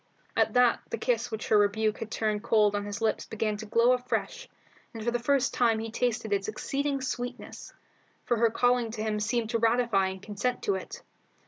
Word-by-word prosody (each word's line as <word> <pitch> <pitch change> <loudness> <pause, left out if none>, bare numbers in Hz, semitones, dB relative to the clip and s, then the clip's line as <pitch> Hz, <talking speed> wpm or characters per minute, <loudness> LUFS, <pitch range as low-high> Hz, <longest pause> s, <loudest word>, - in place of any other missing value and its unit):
At - - +2
that 250 -1 +4
the - - -3
kiss 235 +1 0
which 220 -1 -5
her 215 - +5
rebuke 215 +1 +1
had 225 - -5
turned 215 -2 -1
cold 210 -2 +3
on 205 0 -2
his 205 +1 -5
lips 225 - 0
began 215 -1 -2
to 220 +1 -8
glow 230 +3 +4
afresh, 255 - -2 0.5
and 225 - -6
for 235 - 0
the 240 - -1
first 275 +2 +1
time 230 -3 +3
he 225 0 -5
tasted 230 -2 -1
its 200 -1 0
exceeding 275 +5 -2
sweetness; 245 -1 -5 0.5
for 240 - +1
her 230 +1 +4
calling 245 0 +2
to 220 -1 -5
him 215 -1 -1
seemed 225 +1 -1
to 230 - +1
ratify 225 -4 +2
and 190 0 -6
consent 215 +5 -2
to 200 - +1
it. 190 - -6
225 Hz, 205 wpm, -28 LUFS, 215-245 Hz, 0.5 s, her